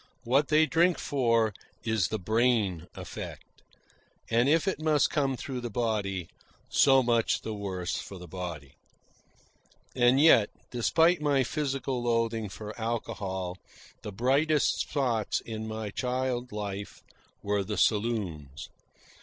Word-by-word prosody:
What 135 Hz, +5 st, +2 dB
they 155 Hz, +1 st, +4 dB
drink 170 Hz, +2 st, +3 dB
for 115 Hz, -5 st, +1 dB, 0.3 s
is 110 Hz, -6 st, +1 dB
the 110 Hz, -, -2 dB
brain 110 Hz, -4 st, +1 dB
effect; -, -, -9 dB, 0.7 s
and 120 Hz, +4 st, +3 dB
if 165 Hz, +5 st, +3 dB
it 190 Hz, -, -1 dB
must 155 Hz, -2 st, +2 dB
come 135 Hz, -3 st, 0 dB
through 130 Hz, -1 st, -5 dB
the 120 Hz, -, -4 dB
body, 100 Hz, -6 st, -1 dB, 0.4 s
so 135 Hz, -1 st, +5 dB
much 115 Hz, -2 st, +1 dB
the 110 Hz, -, -4 dB
worse 95 Hz, -4 st, -3 dB
for 95 Hz, -, -7 dB
the 90 Hz, 0 st, -10 dB
body. 85 Hz, -6 st, -7 dB, 1.2 s
And 125 Hz, +1 st, +4 dB
yet, 130 Hz, -9 st, +6 dB, 0.2 s
despite 160 Hz, +8 st, +3 dB
my 140 Hz, -3 st, +2 dB
physical 135 Hz, -2 st, -2 dB
loathing 115 Hz, -2 st, 0 dB
for 105 Hz, +2 st, -8 dB
alcohol, 95 Hz, -5 st, -3 dB, 0.4 s
the 105 Hz, -, -6 dB
brightest 140 Hz, +8 st, +2 dB
spots 120 Hz, -7 st, 0 dB
in 110 Hz, -1 st, -6 dB
my 110 Hz, -1 st, -4 dB
child 125 Hz, +1 st, -2 dB
life 100 Hz, -1 st, -6 dB, 0.4 s
were 100 Hz, 0 st, 0 dB
the 105 Hz, +1 st, -4 dB
saloons. 95 Hz, -, -1 dB
115 Hz, 130 wpm, -28 LUFS, 100-130 Hz, 1.2 s, yet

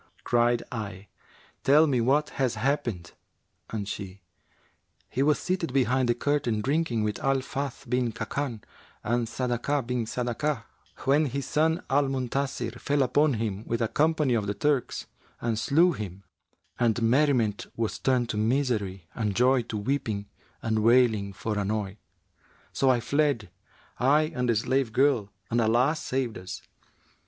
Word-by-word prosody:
Cried 120 Hz, 0 st, +2 dB
I, 105 Hz, -4 st, -6 dB, 0.5 s
'Tell 150 Hz, +4 st, +6 dB
me 130 Hz, -6 st, +1 dB
what 140 Hz, +5 st, +2 dB
has 130 Hz, -4 st, 0 dB
happened;' 115 Hz, -7 st, -1 dB, 0.6 s
and 105 Hz, -3 st, -4 dB
she, 100 Hz, -1 st, -6 dB, 0.9 s
'He 130 Hz, -, -1 dB
was 150 Hz, +1 st, +4 dB
seated 180 Hz, -6 st, -2 dB
behind 130 Hz, -1 st, +2 dB
the 120 Hz, -, +3 dB
curtain, 140 Hz, -4 st, 0 dB
drinking, 135 Hz, -4 st, 0 dB
with 105 Hz, -1 st, -2 dB
Al 135 Hz, -2 st, +1 dB
Fath 135 Hz, +1 st, -5 dB
bin 125 Hz, -1 st, +1 dB
Khбkбn[FN#371] 120 Hz, -1 st, -4 dB, 0.4 s
and 120 Hz, 0 st, 0 dB
Sadakah 125 Hz, +3 st, -1 dB
bin 120 Hz, -1 st, -1 dB
Sadakah, 125 Hz, +2 st, -2 dB, 0.4 s
when 145 Hz, +3 st, +4 dB
his 140 Hz, +1 st, -3 dB
son 160 Hz, +3 st, +1 dB
Al 140 Hz, +1 st, +3 dB
Muntasir 130 Hz, -2 st, -2 dB
fell 145 Hz, -1 st, +1 dB
upon 145 Hz, +2 st, +3 dB
him, 105 Hz, -2 st, -3 dB
with 115 Hz, -, -1 dB
a 115 Hz, -, +1 dB
company 150 Hz, -1 st, +2 dB
of 110 Hz, -3 st, 0 dB
the 100 Hz, -, -1 dB
Turks,[FN#372] 140 Hz, -4 st, -3 dB
and 110 Hz, -2 st, 0 dB
slew 165 Hz, +9 st, +4 dB
him; 100 Hz, -, -6 dB, 0.6 s
and 120 Hz, -1 st, +2 dB
merriment 120 Hz, -4 st, +2 dB
was 115 Hz, -2 st, -2 dB
turned 125 Hz, -2 st, +1 dB
to 110 Hz, -, -2 dB
misery 110 Hz, -6 st, 0 dB
and 105 Hz, -4 st, -2 dB
joy 125 Hz, +2 st, +4 dB
to 115 Hz, -2 st, -5 dB
weeping 105 Hz, -3 st, -2 dB, 0.4 s
and 110 Hz, -1 st, +1 dB
wailing 110 Hz, -3 st, +4 dB
for 105 Hz, +2 st, -3 dB
annoy. 100 Hz, -1 st, -2 dB, 0.8 s
So 135 Hz, -, +2 dB
I 125 Hz, -2 st, +3 dB
fled, 140 Hz, -6 st, 0 dB, 0.5 s
I 150 Hz, +5 st, +3 dB
and 125 Hz, -3 st, -1 dB
the 115 Hz, -, +3 dB
slave 125 Hz, +1 st, 0 dB
girl, 130 Hz, -7 st, +3 dB, 0.2 s
and 120 Hz, +1 st, +2 dB
Allah 120 Hz, +7 st, +3 dB
saved 130 Hz, -, -2 dB
us.' 90 Hz, 0 st, -8 dB
125 Hz, 150 wpm, -27 LUFS, 110-140 Hz, 0.9 s, Tell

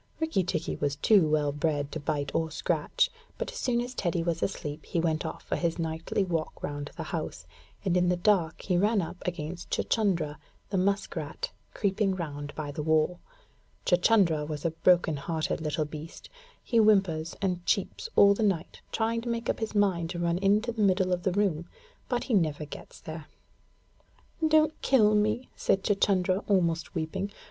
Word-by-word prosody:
Rikki 320 Hz, -, +1 dB
tikki 165 Hz, -2 st, -2 dB
was 145 Hz, -1 st, -1 dB
too 180 Hz, +3 st, +4 dB
well 150 Hz, -1 st, +2 dB
bred 145 Hz, -1 st, -1 dB
to 160 Hz, -, -4 dB
bite 145 Hz, -2 st, -2 dB
or 160 Hz, -1 st, 0 dB
scratch, 155 Hz, -, 0 dB, 0.3 s
but -, -, -3 dB
as -, -, -9 dB
soon 240 Hz, -2 st, +1 dB
as 245 Hz, +1 st, -5 dB
Teddy 175 Hz, -6 st, -1 dB
was 165 Hz, -1 st, -1 dB
asleep 155 Hz, -5 st, -3 dB
he 170 Hz, -, -2 dB
went 160 Hz, -1 st, 0 dB
off 160 Hz, -, -7 dB
for -, -, -2 dB
his 170 Hz, -2 st, -1 dB
nightly 165 Hz, +3 st, -1 dB
walk 165 Hz, -4 st, -3 dB
round 145 Hz, 0 st, -4 dB
the -, -, -3 dB
house, -, -, -5 dB, 0.4 s
and 185 Hz, -2 st, +2 dB
in 180 Hz, 0 st, +3 dB
the 180 Hz, -, +2 dB
dark 175 Hz, -4 st, +2 dB
he 180 Hz, -2 st, +1 dB
ran 210 Hz, +2 st, +3 dB
up 180 Hz, 0 st, -4 dB
against 175 Hz, 0 st, -4 dB
Chuchundra, 170 Hz, -9 st, 0 dB, 0.3 s
the 195 Hz, -, +1 dB
musk 200 Hz, +2 st, 0 dB
rat, -, -, -4 dB, 0.2 s
creeping 195 Hz, -1 st, +1 dB
round 145 Hz, -4 st, -5 dB
by 150 Hz, -2 st, -4 dB
the 150 Hz, -, -4 dB
wall. 160 Hz, +3 st, +2 dB, 0.7 s
Chuchundra 175 Hz, -4 st, +4 dB
is 150 Hz, 0 st, -5 dB
a 165 Hz, -, +2 dB
broken 170 Hz, -2 st, +3 dB
hearted 160 Hz, +2 st, -2 dB
little 155 Hz, 0 st, -1 dB
beast, 155 Hz, +2 st, -9 dB, 0.3 s
He 235 Hz, -, 0 dB
whimpers 195 Hz, -7 st, +3 dB
and 180 Hz, -3 st, -1 dB
cheeps 460 Hz, -, 0 dB
all 200 Hz, 0 st, +7 dB
the 200 Hz, -, -3 dB
night, 190 Hz, -6 st, -1 dB
trying 230 Hz, +1 st, 0 dB
to 235 Hz, -, -5 dB
make 235 Hz, 0 st, 0 dB
up -, -, -7 dB
his 220 Hz, -1 st, -3 dB
mind 185 Hz, -5 st, +2 dB
to 175 Hz, -, -4 dB
run 170 Hz, 0 st, +1 dB
into 210 Hz, +4 st, +2 dB
the 230 Hz, -2 st, -3 dB
middle 185 Hz, -2 st, +3 dB
of 180 Hz, -, -1 dB
the 190 Hz, -, +1 dB
room, 175 Hz, -4 st, 0 dB, 0.4 s
but 245 Hz, -, 0 dB
he 255 Hz, -, -2 dB
never 155 Hz, -6 st, +1 dB
gets 145 Hz, -, -10 dB
there. 155 Hz, -1 st, -7 dB, 1.2 s
'Don't 310 Hz, 0 st, +3 dB
kill 215 Hz, -6 st, +4 dB
me,' 215 Hz, +4 st, +1 dB
said 195 Hz, -, +1 dB
Chuchundra, 195 Hz, -2 st, +2 dB
almost 170 Hz, -4 st, +1 dB
weeping. 180 Hz, +5 st, -2 dB
175 Hz, 185 wpm, -28 LUFS, 160-200 Hz, 1.2 s, all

